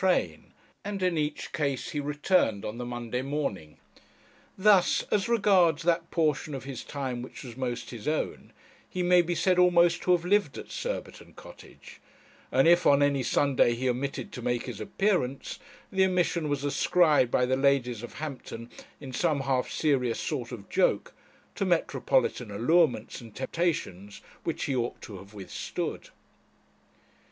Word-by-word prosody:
train 90 Hz, -, 0 dB, 0.3 s
and 200 Hz, -1 st, -4 dB
in 180 Hz, -2 st, +2 dB
each 150 Hz, -1 st, -2 dB
case 140 Hz, -4 st, -2 dB
he 150 Hz, -, -2 dB
returned 145 Hz, -, +1 dB
on 110 Hz, +3 st, -5 dB
the 125 Hz, -, -4 dB
Monday 120 Hz, 0 st, -3 dB
morning. 130 Hz, -, -4 dB, 0.8 s
Thus, 195 Hz, -1 st, +4 dB
as 205 Hz, +2 st, +1 dB
regards 190 Hz, -9 st, +3 dB
that 170 Hz, 0 st, +1 dB
portion 155 Hz, -3 st, 0 dB
of 135 Hz, -, -6 dB
his 135 Hz, -2 st, -6 dB
time 130 Hz, -4 st, -4 dB
which 130 Hz, +6 st, -9 dB
was 120 Hz, -3 st, -9 dB
most 125 Hz, -2 st, -4 dB
his 120 Hz, 0 st, -8 dB
own, 155 Hz, +1 st, -2 dB, 0.4 s
he 180 Hz, -, -2 dB
may 180 Hz, 0 st, +5 dB
be 175 Hz, 0 st, -2 dB
said 185 Hz, 0 st, +2 dB
almost 175 Hz, -1 st, +4 dB
to 180 Hz, -, +1 dB
have 175 Hz, -1 st, +1 dB
lived 195 Hz, -6 st, +2 dB
at -, -, -9 dB
Surbiton -, -, -5 dB
Cottage, -, -, -14 dB, 0.5 s
and 135 Hz, +4 st, +4 dB
if 175 Hz, +1 st, +5 dB
on 140 Hz, 0 st, +5 dB
any 140 Hz, -1 st, +2 dB
Sunday 130 Hz, -2 st, +2 dB
he 130 Hz, +2 st, -2 dB
omitted 130 Hz, +3 st, -2 dB
to 125 Hz, -, -7 dB
make 120 Hz, 0 st, -1 dB
his 115 Hz, -5 st, -6 dB
appearance, 140 Hz, -, -1 dB, 0.3 s
the 190 Hz, -1 st, +3 dB
omission 175 Hz, -4 st, 0 dB
was 145 Hz, -1 st, -1 dB
ascribed 150 Hz, -2 st, +3 dB
by 125 Hz, -, +2 dB
the 130 Hz, +1 st, +1 dB
ladies 130 Hz, -4 st, +1 dB
of 120 Hz, -, -8 dB
Hampton, 125 Hz, -6 st, -7 dB, 0.3 s
in 135 Hz, -3 st, -9 dB
some 155 Hz, -4 st, +1 dB
half 130 Hz, -2 st, 0 dB
serious 130 Hz, -6 st, 0 dB
sort 130 Hz, -6 st, -3 dB
of 105 Hz, -5 st, -8 dB
joke, -, -, +1 dB, 0.4 s
to -, -, -2 dB
metropolitan 125 Hz, -4 st, +1 dB
allurements 120 Hz, +3 st, +1 dB
and 115 Hz, -3 st, -13 dB
temptations 130 Hz, -, -2 dB, 0.2 s
which 165 Hz, -, -3 dB
he 135 Hz, -, -1 dB
ought 120 Hz, -1 st, -2 dB
to 100 Hz, -4 st, -8 dB
have 100 Hz, +2 st, -14 dB
withstood. 95 Hz, -2 st, -5 dB
140 Hz, 160 wpm, -28 LUFS, 120-170 Hz, 0.8 s, may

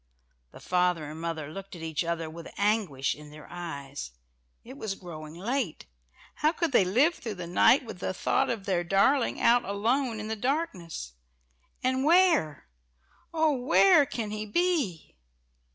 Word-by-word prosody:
The -, -, -13 dB
father 180 Hz, -4 st, +1 dB
and 160 Hz, +1 st, -8 dB
mother 160 Hz, -3 st, -4 dB
looked 195 Hz, +2 st, -8 dB
at 165 Hz, -, -9 dB
each 160 Hz, -1 st, -2 dB
other 165 Hz, -1 st, -2 dB
with 165 Hz, +1 st, -9 dB
anguish 200 Hz, -10 st, +1 dB
in 150 Hz, 0 st, -12 dB
their 150 Hz, 0 st, -12 dB
eyes. 145 Hz, -, -6 dB, 0.5 s
It 255 Hz, +3 st, -11 dB
was 220 Hz, -7 st, -4 dB
growing 155 Hz, -4 st, -9 dB
late. 225 Hz, -, -2 dB, 0.5 s
How 305 Hz, +1 st, +3 dB
could 335 Hz, -3 st, -1 dB
they 240 Hz, -, +5 dB
live 250 Hz, -, +3 dB
through 225 Hz, -9 st, -6 dB
the 180 Hz, -2 st, -6 dB
night 210 Hz, +10 st, +4 dB
with 200 Hz, -, -8 dB
the -, -, -2 dB
thought 185 Hz, -, 0 dB
of 215 Hz, -5 st, -3 dB
their 180 Hz, -3 st, 0 dB
darling 200 Hz, +9 st, +2 dB
out 240 Hz, +1 st, +4 dB
alone 230 Hz, +4 st, 0 dB
in 215 Hz, -, -5 dB
the 220 Hz, -, -2 dB
darkness? 205 Hz, -, -3 dB, 0.7 s
And 260 Hz, +1 st, +1 dB
where? 325 Hz, -, +3 dB, 0.7 s
"Oh, 320 Hz, -2 st, +2 dB
where 285 Hz, +4 st, +5 dB
can 220 Hz, -4 st, -4 dB
he 215 Hz, 0 st, -3 dB
be?" 290 Hz, -, 0 dB
200 Hz, 160 wpm, -28 LUFS, 165-260 Hz, 0.7 s, they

